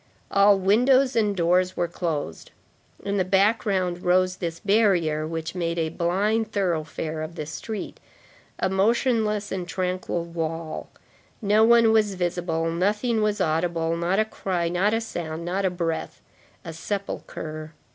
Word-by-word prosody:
All 200 0 +5
windows 250 +7 +3
and 210 -3 +2
doors 180 +2 +2
were 175 - +1
closed. 155 - -4 0.5
In 200 0 -1
the 190 - +3
background 190 -2 +1
rose 185 0 +2
this 170 -3 -4
barrier, 185 -8 +2
which 160 0 -4
made 170 -2 -2
a 160 -1 0
blind 205 +7 0
thoroughfare 160 -5 -2
of 155 +2 -6
the 155 - -4
street, 190 +8 -6 0.6
a - - +1
motionless 215 +1 +1
and 185 -2 -3
tranquil 180 -2 -2
wall; 165 -1 -4 0.5
no 210 0 +3
one 230 0 +6
was 215 -3 +2
visible, 175 -2 -1
nothing 210 +6 0
was 210 0 0
audible; 165 -1 0
not 170 +3 0
a 215 - +3
cry, 180 -5 -2
not 185 +4 +1
a 225 +1 0
sound, 170 -6 -5
not 190 +3 -1
a - - +3
breath. 170 -2 -3 0.5
A 165 - -6
sepulchre. 155 -4 -5
185 Hz, 145 wpm, -25 LUFS, 165-205 Hz, 0.6 s, one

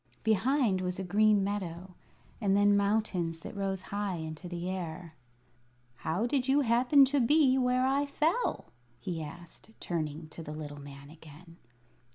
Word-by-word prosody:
Behind 220 -1 +2
was 180 0 -3
a 190 - -3
green 205 +2 +3
meadow, 185 -2 -4 0.5
and 200 -2 +2
then 205 0 +5
mountains 200 -5 0
that - - -8
rose 195 -2 -2
high 205 -2 -1
into 160 +2 -7
the 175 0 -4
air. 175 -3 -5 0.8
"How 170 - -1
did 255 +1 0
you 275 +2 +4
happen 255 +3 +5
to 280 +2 +1
be 265 +1 +4
where 250 0 +2
I 275 +2 +1
fell?" 320 +11 -1 0.3
he 165 +6 -4
asked, 170 +6 -11
turning 155 -2 -4
to 165 - -9
the 150 -1 -7
little 145 -2 -7
man 140 0 -11
again. 160 +2 -15
190 Hz, 155 wpm, -30 LUFS, 165-235 Hz, 0.8 s, then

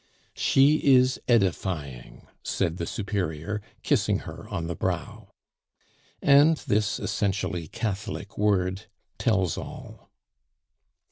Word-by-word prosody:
"She 140 +3 +4 0.2
is 130 +1 +3
edifying," 90 - -1 0.2
said 85 +1 -1
the 85 - -3
Superior, 100 -1 -3 0.2
kissing - - +2
her - - -9
on 80 - -3
the 85 - -3
brow. - - -4 0.9
And 145 +3 +6
this 105 -4 0
essentially 90 -4 -2
Catholic 105 0 -4
word 100 -1 0 0.3
tells 95 - +1
all. - - -10
100 Hz, 95 wpm, -26 LUFS, 85-115 Hz, 0.9 s, And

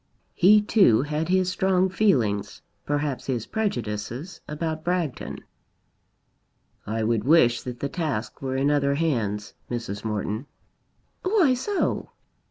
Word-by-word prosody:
He 210 +4 +6
too 190 - +4
had 150 +3 -2
his 185 0 +2
strong 190 0 +2
feelings, 125 - +1 0.2
perhaps 145 -2 -1
his 120 -4 -1
prejudices, 125 - -3
about 155 +1 -3
Bragton. 175 -5 -2 1.4
"I 110 +1 -1
would 110 -1 +1
wish 120 -5 +4
that 125 -1 -7
the 140 - 0
task 135 -8 -3
were 130 -1 -2
in 140 +2 +2
other 140 -1 +2
hands, 115 -10 -1 0.2
Mrs. 115 -4 -4
Morton." 110 +3 -3 0.7
"Why 370 -8 +3
so?" 375 +11 -1
145 Hz, 120 wpm, -25 LUFS, 115-180 Hz, 1.4 s, He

